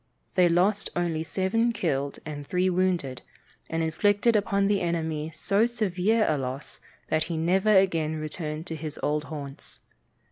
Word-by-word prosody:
They 180 Hz, -2 st, +5 dB
lost 190 Hz, +5 st, +2 dB
only 170 Hz, -2 st, 0 dB
seven 200 Hz, +8 st, +1 dB
killed 140 Hz, -8 st, -1 dB
and 145 Hz, -2 st, -6 dB
three 185 Hz, +1 st, +1 dB
wounded, 175 Hz, -9 st, 0 dB, 0.5 s
and 165 Hz, 0 st, -1 dB
inflicted 205 Hz, +8 st, +2 dB
upon 200 Hz, -1 st, +2 dB
the 200 Hz, -1 st, +2 dB
enemy 160 Hz, -3 st, -1 dB
so 200 Hz, +7 st, +1 dB
severe 215 Hz, -1 st, +1 dB
a 150 Hz, -2 st, +1 dB
loss 130 Hz, +2 st, -4 dB, 0.3 s
that 155 Hz, 0 st, +1 dB
he 165 Hz, -1 st, -3 dB
never 185 Hz, +6 st, +2 dB
again 165 Hz, -5 st, +2 dB
returned 155 Hz, 0 st, -5 dB
to 165 Hz, -, -5 dB
his 155 Hz, -1 st, -6 dB
old 150 Hz, 0 st, 0 dB
haunts. 140 Hz, -2 st, -7 dB
170 Hz, 150 wpm, -27 LUFS, 155-195 Hz, 0.5 s, They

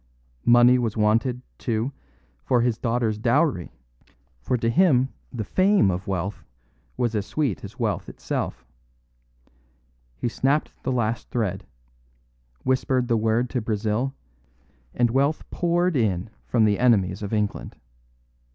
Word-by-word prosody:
Money 120 Hz, +1 st, +6 dB
was 115 Hz, -3 st, -2 dB
wanted, 115 Hz, +4 st, +1 dB, 0.2 s
too, 115 Hz, +2 st, -1 dB, 0.5 s
for 125 Hz, -2 st, +2 dB
his 115 Hz, -2 st, 0 dB
daughter's 115 Hz, -3 st, 0 dB
dowry; 125 Hz, -, +1 dB, 0.7 s
for 125 Hz, -, 0 dB
to 115 Hz, -, -1 dB
him 130 Hz, -2 st, +4 dB, 0.2 s
the 120 Hz, -4 st, -4 dB
fame 185 Hz, -, +3 dB
of 90 Hz, +3 st, -4 dB
wealth 95 Hz, +1 st, -3 dB, 0.5 s
was 120 Hz, -2 st, 0 dB
as 105 Hz, -2 st, 0 dB
sweet 135 Hz, -, -2 dB
as -, -, -9 dB
wealth -, -, -2 dB
itself. -, -, -4 dB, 1.5 s
He -, -, -2 dB
snapped 135 Hz, +5 st, 0 dB
the 130 Hz, -, -2 dB
last 115 Hz, -2 st, -1 dB
thread, 110 Hz, -, -2 dB, 1.0 s
whispered 130 Hz, -1 st, +1 dB
the 115 Hz, -, +3 dB
word 110 Hz, +2 st, +1 dB
to 125 Hz, -, -1 dB
Brazil, 110 Hz, +4 st, -1 dB, 0.8 s
and 120 Hz, -1 st, +2 dB
wealth 140 Hz, +4 st, +1 dB
poured 175 Hz, 0 st, +1 dB
in 105 Hz, -5 st, 0 dB, 0.2 s
from 115 Hz, -3 st, +3 dB
the 105 Hz, -1 st, +2 dB
enemies 100 Hz, -6 st, +3 dB
of 100 Hz, -, -4 dB
England. 105 Hz, -2 st, -2 dB
120 Hz, 130 wpm, -24 LUFS, 110-130 Hz, 1.5 s, Money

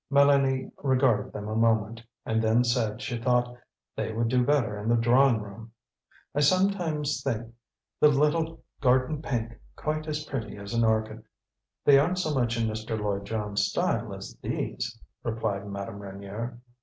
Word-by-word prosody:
Mélanie 140 Hz, -2 st, +4 dB
regarded 130 Hz, -6 st, +2 dB
them 105 Hz, 0 st, -6 dB
a 110 Hz, -, -3 dB
moment, 115 Hz, 0 st, +2 dB, 0.2 s
and 110 Hz, 0 st, +1 dB
then 115 Hz, +2 st, +3 dB
said 120 Hz, -2 st, 0 dB
she 120 Hz, -2 st, -3 dB
thought 125 Hz, 0 st, +1 dB, 0.4 s
they -, -, -2 dB
would 115 Hz, +1 st, 0 dB
do 125 Hz, +1 st, +3 dB
better 120 Hz, -7 st, +1 dB
in 105 Hz, +2 st, -3 dB
the 120 Hz, -, +4 dB
drawing 120 Hz, +1 st, +4 dB
room. 110 Hz, +2 st, -10 dB, 0.6 s
"I -, -, 0 dB
sometimes 160 Hz, -3 st, +2 dB
think 115 Hz, -3 st, -3 dB, 0.5 s
the -, -, +7 dB
little 150 Hz, +3 st, +1 dB, 0.2 s
garden 130 Hz, +3 st, +2 dB
pink 115 Hz, -5 st, -3 dB, 0.2 s
quite 155 Hz, 0 st, -3 dB
as 155 Hz, 0 st, -2 dB
pretty 115 Hz, -9 st, -5 dB
as 100 Hz, +2 st, -7 dB
an 115 Hz, 0 st, +2 dB
orchid." 110 Hz, 0 st, +1 dB, 0.6 s
"They 140 Hz, -1 st, +8 dB
aren't 175 Hz, +6 st, +1 dB
so 160 Hz, -5 st, 0 dB
much 120 Hz, -3 st, 0 dB
in 115 Hz, -, +1 dB
Mr. 110 Hz, 0 st, -3 dB
Lloyd 100 Hz, -1 st, -2 dB
Jones' 105 Hz, -1 st, -1 dB
style -, -, -1 dB
as -, -, -9 dB
these," 115 Hz, -1 st, -3 dB, 0.2 s
replied 110 Hz, -4 st, -2 dB
Madame 100 Hz, 0 st, -6 dB
Reynier. 100 Hz, +4 st, -6 dB
115 Hz, 160 wpm, -27 LUFS, 110-140 Hz, 0.6 s, They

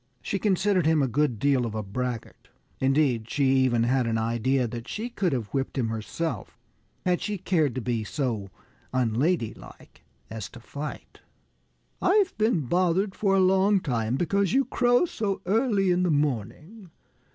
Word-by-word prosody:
She 195 Hz, -, -2 dB
considered 190 Hz, -3 st, +2 dB
him 160 Hz, -3 st, +3 dB
a -, -, +2 dB
good 140 Hz, -1 st, 0 dB
deal 135 Hz, +2 st, +2 dB
of 115 Hz, -2 st, -4 dB
a 110 Hz, -, -2 dB
braggart. 120 Hz, +4 st, -5 dB, 0.3 s
Indeed, 130 Hz, -4 st, +1 dB
she 145 Hz, -, 0 dB
even 130 Hz, -3 st, +3 dB
had 125 Hz, 0 st, +1 dB
an 115 Hz, -1 st, 0 dB
idea 120 Hz, +3 st, 0 dB
that 120 Hz, +1 st, -7 dB
she 225 Hz, +3 st, -4 dB
could 190 Hz, -6 st, 0 dB
have 120 Hz, -6 st, -2 dB
whipped 135 Hz, 0 st, -3 dB
him 120 Hz, -4 st, 0 dB
herself, 115 Hz, +9 st, -4 dB, 0.5 s
had 180 Hz, -1 st, +1 dB
she 210 Hz, -1 st, -2 dB
cared 160 Hz, -8 st, +1 dB
to 130 Hz, -, -2 dB
be 115 Hz, -2 st, -1 dB
so 110 Hz, -6 st, -3 dB, 0.4 s
unladylike 120 Hz, -, -2 dB, 0.2 s
as 110 Hz, -3 st, -6 dB
to 120 Hz, -, -12 dB
fight. 145 Hz, +5 st, -8 dB, 0.8 s
"I've 385 Hz, 0 st, +3 dB
been 215 Hz, -6 st, +2 dB
bothered 180 Hz, -, +1 dB
for 195 Hz, -1 st, +1 dB
a -, -, +4 dB
long 190 Hz, +2 st, +4 dB
time 120 Hz, -7 st, -1 dB
because 195 Hz, +6 st, +1 dB
you 270 Hz, +1 st, +3 dB
crow 245 Hz, +4 st, +3 dB
so 210 Hz, -, -2 dB
early 205 Hz, -2 st, +2 dB
in 180 Hz, 0 st, +2 dB
the 180 Hz, -, +1 dB
morning. 150 Hz, -, -2 dB
145 Hz, 165 wpm, -26 LUFS, 120-190 Hz, 0.8 s, a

